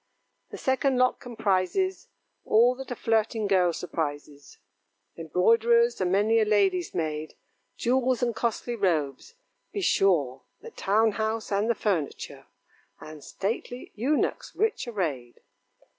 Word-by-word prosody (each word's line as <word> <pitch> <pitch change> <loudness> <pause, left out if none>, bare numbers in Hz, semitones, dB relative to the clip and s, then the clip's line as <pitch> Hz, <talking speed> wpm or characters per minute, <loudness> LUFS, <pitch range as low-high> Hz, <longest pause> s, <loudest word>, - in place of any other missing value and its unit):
The - - -8
second 265 0 +1
lot 255 0 +2
comprises 235 - -1 0.4
All 235 +3 +4
that 265 +1 -9
a 245 - -3
flirting 225 -1 0
girl 185 -3 +3
surprises: 145 -4 -5 0.6
Embroiderer's, 230 +8 +2
and 180 -1 +1
many 210 +4 +3
a - - +4
lady's 195 -5 +1
maid, 155 -2 -3 0.4
Jewels, 255 0 +1
and 235 -2 0
costly 235 +1 -2
robes; 165 - -1 0.4
be 405 - -3
sure 155 - +2 0.2
The 465 - -10
town 220 - +2
house, 220 +1 -3
and 205 +3 +1
the 235 - +2
furniture, 180 -11 -3 0.5
And 155 -2 -11
stately 235 +4 -5
eunuchs, 265 +8 -1
rich 440 - 0
arrayed. 150 - -4
215 Hz, 125 wpm, -26 LUFS, 175-240 Hz, 0.6 s, All